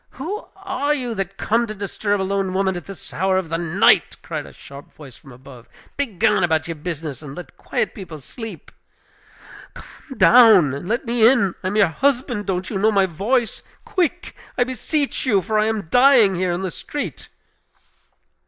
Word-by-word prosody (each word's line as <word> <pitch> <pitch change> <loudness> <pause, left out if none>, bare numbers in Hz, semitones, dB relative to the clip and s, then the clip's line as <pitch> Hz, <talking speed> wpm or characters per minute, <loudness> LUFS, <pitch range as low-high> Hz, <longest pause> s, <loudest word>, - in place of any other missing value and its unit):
"Who 370 - -6
are 295 -7 -1
you, 250 -4 -3
that 195 -2 -4
come 235 +2 +1
to 215 - -6
disturb 205 0 -2
a - - 0
lone 195 -1 -1
woman 190 -1 +1
at 175 - -7
this 195 -3 -11
hour 190 +1 +1
of 185 -4 -2
the 165 +1 -2
night?" 185 +3 +3
cried 155 -3 -5
a - - -12
sharp 140 +1 -13
voice 135 -5 -13
from 135 - -16
above. 125 -1 -14 0.3
"Begone 210 -7 +1
about 160 -2 +1
your 165 - -3
business, 155 -3 -6
and 140 -2 -9
let 180 - -10
quiet - - -2
people 180 -6 -9
sleep." 225 - -10 1.0
"Come 270 -5 -13
down 215 - +6
and 140 +6 -6
let 235 +4 -1
me 230 -1 +4
in! 235 -9 +2
I - - -1
am 195 - -2
your 210 -2 +5
husband! 245 - -1
Don't 185 0 -2
you 195 - -2
know 215 +2 +3
my 195 -2 +3
voice? 215 +8 -1 0.2
Quick, 360 -6 -2 0.2
I 245 - +4
beseech 260 +3 -2
you; 205 -6 +4
for 215 +3 -1
I 215 - +2
am 220 -2 -1
dying 245 -5 +5
here 180 0 -1
in 175 +2 -3
the 185 - -3
street!" 290 - -6
200 Hz, 190 wpm, -21 LUFS, 175-245 Hz, 1.0 s, down